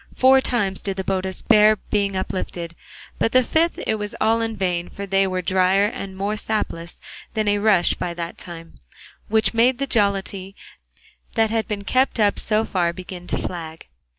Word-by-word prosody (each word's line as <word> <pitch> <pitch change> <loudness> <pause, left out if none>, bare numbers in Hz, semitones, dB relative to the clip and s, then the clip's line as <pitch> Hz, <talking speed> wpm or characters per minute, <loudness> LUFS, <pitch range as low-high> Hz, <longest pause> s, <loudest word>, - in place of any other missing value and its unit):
Four 265 +1 +6
times 200 -7 0
did 195 -1 -4
the 190 - -2
botas 190 0 0
bear 215 -1 +6
being 200 -1 -1
uplifted, 175 -2 -4 0.5
but 225 - +1
the 255 0 +5
fifth 325 +7 +1
it 220 -1 0
was 210 0 -5
all 225 +1 +2
in 225 -1 -2
vain, 180 -3 -1
for 200 - -7
they 195 0 +2
were 185 -1 -2
drier 185 +2 +3
and 195 -2 -5
more 200 +2 -1
sapless 210 -6 -3 0.4
than 215 -1 0
a 205 0 +2
rush 205 -4 +4
by 175 -1 -4
that 170 0 -5
time, 165 -2 -10 0.5
which 220 +2 +2
made 240 +2 +3
the 275 - -1
jollity 200 -4 -1 0.8
that 225 -2 +2
had 225 -1 0
been 205 -1 -4
kept 255 +3 +1
up 205 -2 +3
so 215 +1 +1
far 175 -4 0
begin 180 0 -9
to - - -1
flag. 165 -2 -6
200 Hz, 180 wpm, -22 LUFS, 185-220 Hz, 0.8 s, Four